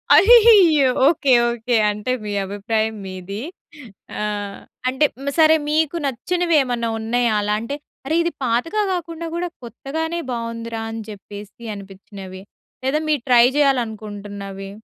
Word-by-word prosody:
అయ్యయ్యో! 400 - +7 0.2
Okay. 285 -3 +2 0.2
Okay. 235 +1 -1 0.2
అంటే 210 +4 -4
మీ 210 - -4
అభిప్రాయం 215 +3 -2
మీది. 190 +1 -7 0.8
ఆ! - - -2 0.7
అంటే 265 +4 +2 0.3
సరే 315 0 +7
మీకు 315 +1 +1
నచ్చినవి 340 +7 0
ఏమన్నా 240 -2 -2
ఉన్నాయా? 235 +1 0
అలా 205 0 0
అంటే, 230 +5 -4 0.3
అరే! 310 +4 0
ఇది 340 - -1
పాతగా 255 - 0
కాకుండా 335 -1 -5
కూడా 350 +1 -2
కొత్తగానే 320 +8 -4
బాగుందిరా! 230 -1 -4
అని 225 0 -6
చెప్పేసి 205 +2 -11
అనిపించినవి? 195 -1 -10 0.4
లేదా 270 +4 +1
మీరు 300 -4 +1
ట్రై 240 -1 +7
చేయాలనుకుంటున్నవి? 205 -7 -2
235 Hz, 120 wpm, -21 LUFS, 210-310 Hz, 0.8 s, అయ్యయ్యో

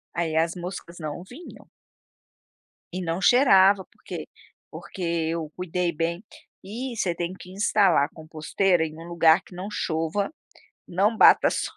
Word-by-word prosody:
Aí 165 -2 -1
as 165 +2 +1
moscas 175 -1 -8
não 155 +3 -6
vinham. 260 - -13 1.3
E 185 - -3
não 170 +1 -2
cheirava, 195 -4 +5
porque - - -8 0.4
porque 190 - -10 0.3
eu 160 -2 -4
cuidei 180 -1 -2
bem. 170 +4 -3 0.4
E 235 +5 -6
você 180 -5 0
tem 175 +2 -3
que 185 -1 -12
instalar 195 -6 +3
a - - -10
composteira 160 +3 -1
em 155 0 -8
um 165 - -9
lugar 170 +1 +4
que - - -17
não 185 +3 -6
chova, 165 - -2 0.6
não 200 +6 +1
bata - - +6
sol. - - -3
180 Hz, 150 wpm, -25 LUFS, 165-195 Hz, 1.3 s, bata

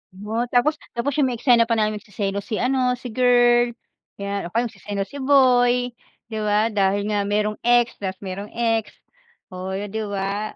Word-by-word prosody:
Oh, 220 +5 -3
tapos 250 +6 +2 0.2
tapos 275 +5 -1
yung 275 - +4
may 250 - -2
eksena 235 -1 +4
pa 230 - +1
namin 215 -1 0
magseselos 200 -1 -4
si 220 - -2
ano 250 +1 +1
si 250 -1 -8
girl, 240 0 +4 0.4
'yan, 200 -2 -4
o 175 - -13
kaya 235 - +3
magseselos 200 -2 -5
si 285 - -7
boy, 250 -2 +4 0.4
di 220 - -3
ba? 210 +1 +1
Dahil 200 0 +1
nga 205 -1 0
merong 210 +1 0
ex, 240 0 +2
tas 190 -1 -3
merong 195 +2 -5
ex, 225 -2 0 0.6
oh, 185 +1 -5
di 205 +2 -4
ba? 200 +1 -3
220 Hz, 175 wpm, -22 LUFS, 200-245 Hz, 0.6 s, yung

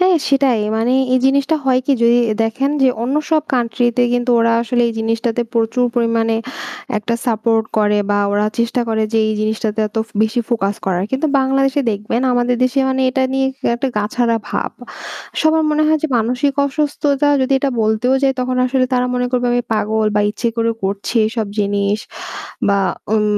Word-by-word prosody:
হ্যাঁ, 365 -1 +4
সেটাই 270 -4 +2 0.2
মানে 230 +3 +1 0.2
এই - - +4
জিনিসটা 280 +3 +2
হয় 255 -1 +3
কি 285 - +3
যদি 235 +1 +5 0.3
দেখেন 270 +5 -1
যে 265 - +5
অন্য 260 +5 -1
সব 310 -1 +3
কান্ট্রিতে 240 0 +1
কিন্তু 245 0 0
ওরা 230 0 +3
আসলে 240 +1 0
এই - - -3
জিনিসটাতে 225 +1 -1
প্রচুর 230 +2 +1
পরিমাণে 230 -1 +1 0.6
একটা 225 +3 -2
সাপোর্ট 225 -1 +1
করে 210 0 +2
বা 205 - +2
ওরা 205 +1 +1
চেষ্টা 235 +1 0
করে 220 -1 0
যে 225 - +2
এই 215 - 0
জিনিসটাতে 215 0 -1
এত 210 - -17
ব - - -27
বেশি 220 +3 0
ফোকাস 205 -4 0
করার। 185 -1 0
কিন্তু 265 +4 0
বাংলাদেশে 270 +1 +1
দেখবেন 210 +3 -2
আমাদের 245 0 +1
দেশে 255 +2 +1
মানে 265 0 0
এটা 260 +1 0
নিয়ে 270 0 +1 0.3
একটা 265 +2 -1
গাছাড়া 230 +3 0
ভাব। - - -3 0.7
সবার 315 0 +3
মনে 305 0 +2
হয় 310 0 +3
যে - - +2
মানসিক 250 +5 0
অসুস্থতা 290 0 0
যদি 260 +1 0
এটা 275 +1 0
বলতেও 220 +4 +1
যাই, 270 - +3
তখন 255 0 -1
আসলে 255 0 +1
তারা 250 0 +1
মনে 250 0 0
করবে 250 -1 0
আমি 245 0 +1
পাগল 215 0 0
বা - - +4
ইচ্ছে 225 +3 -2
করে 230 0 +1
করছি 200 +4 -3
এইসব 220 -1 -2
জিনিস 200 0 0 0.7
বা 200 0 +3 0.4
ওন 215 -1 +2
240 Hz, 180 wpm, -17 LUFS, 220-265 Hz, 0.7 s, যদি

